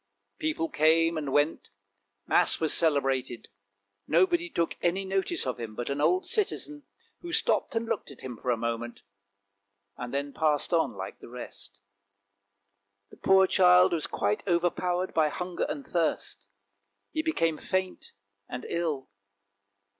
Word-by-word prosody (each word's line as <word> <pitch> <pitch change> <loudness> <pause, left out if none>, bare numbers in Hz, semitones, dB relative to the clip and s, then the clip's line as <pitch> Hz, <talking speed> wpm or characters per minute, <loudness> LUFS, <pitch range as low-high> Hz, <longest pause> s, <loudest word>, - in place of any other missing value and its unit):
People 155 +1 -1
came 165 +2 +3
and 150 -3 -3
went, 145 +3 +1 0.6
mass - - +3
was 160 -2 +2
celebrated, 135 -6 +1 0.6
nobody 360 -1 +3
took 170 - -1
any 185 +3 0
notice 195 - -1
of - - -3
him 110 -2 -6
but 120 +4 -3
an 140 +1 -2
old 365 - +3
citizen, 325 -6 -2 0.3
who 345 - -7
stopped 345 - +1
and 225 0 0
looked - - -3
at 140 - -11
him 130 -2 -6
for 125 - -5
a 120 - +2
moment, 115 +1 -4 0.9
and 125 -1 -6
then 140 0 -3
passed 155 +2 +1
on 165 - +2
like - - -7
the - - -12
rest. 100 - -10 1.3
The - - -15
poor 190 0 +5
child 180 -1 +5
was 160 -3 0
quite 100 +1 -1
overpowered 175 +1 0
by 155 -2 +3
hunger 180 - -3
and 290 -2 -4
thirst; 170 -7 -1 0.6
he 310 - -1
became 165 - 0
faint 185 -1 -2 0.4
and 125 - -6
ill. 155 -6 -2
165 Hz, 145 wpm, -28 LUFS, 140-190 Hz, 1.3 s, poor